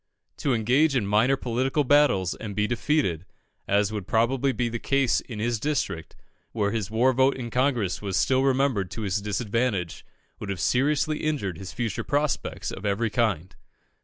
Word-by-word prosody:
To 135 -4 0
engage 130 +7 +2
in 120 -6 +1
minor 110 +7 +3
political 130 +4 0
battles 135 -10 +3
and 105 -3 -7
be 105 +1 +1
defeated, 120 - 0 0.4
as 100 +1 +2
would 100 -3 -5
probably 125 +4 +2
be 125 -2 -1
the 120 0 -4
case 135 -1 +2
in 115 - -9
his 115 +1 -1
district, 130 - -2 0.4
where 105 -3 0
his 110 -4 -2
war 120 +4 +3
vote 130 +2 +3
in 120 -3 -6
Congress 125 -7 0
was 100 -3 -2
still 130 +6 +2
remembered 135 -7 +1
to 95 +5 -6
his 100 0 -1
disadvantage, 105 -3 -2 0.4
would 105 - -6
have 95 -3 -3
seriously 150 - +1
injured 130 - -2
his 95 -3 -7
future 115 -4 -3
prospects 145 0 -1
of 95 - -8
every 105 +2 0
kind. 105 -8 -1
115 Hz, 170 wpm, -25 LUFS, 100-135 Hz, 0.4 s, minor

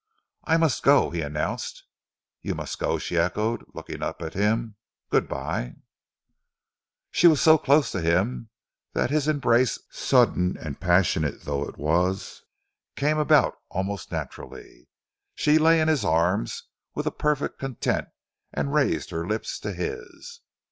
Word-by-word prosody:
"I 165 0 +3
must 160 -5 +1
go," 140 +1 +4
he 85 -1 -2
announced. 75 0 -3 0.6
"You - - -3
must - - -5
go," - - 0
she 85 - -2
echoed, 105 +7 0
looking - - -7
up - - -3
at 80 0 -5
him. 110 +2 0 0.4
"Good - - +2
bye!" - - -4 1.4
She 175 - +5
was 155 -3 +5
so 160 -1 +6
close 145 0 +3
to 95 - -3
him 95 +8 0 0.4
that - - 0
his 150 -1 +1
embrace, 130 -5 +2
sudden 110 -8 +2
and 75 -4 -7
passionate 85 -5 +1
though 70 0 -2
it - - -10
was, 90 +6 -1 0.5
came 150 +2 +1
about 150 - +4 0.2
almost 95 +1 -4
naturally. - - -8 0.5
She 150 +1 +3
lay 165 +1 +5
in 155 - +2
his 155 -3 +2
arms 85 -3 +1 0.3
with - - -2
perfect 150 -1 0
content 135 -3 -2 0.4
and 70 -1 -2
raised - - +1
her 85 +1 -3
lips 110 +2 -3
to 105 - -4
his. 90 -2 -6
105 Hz, 140 wpm, -25 LUFS, -, 1.4 s, so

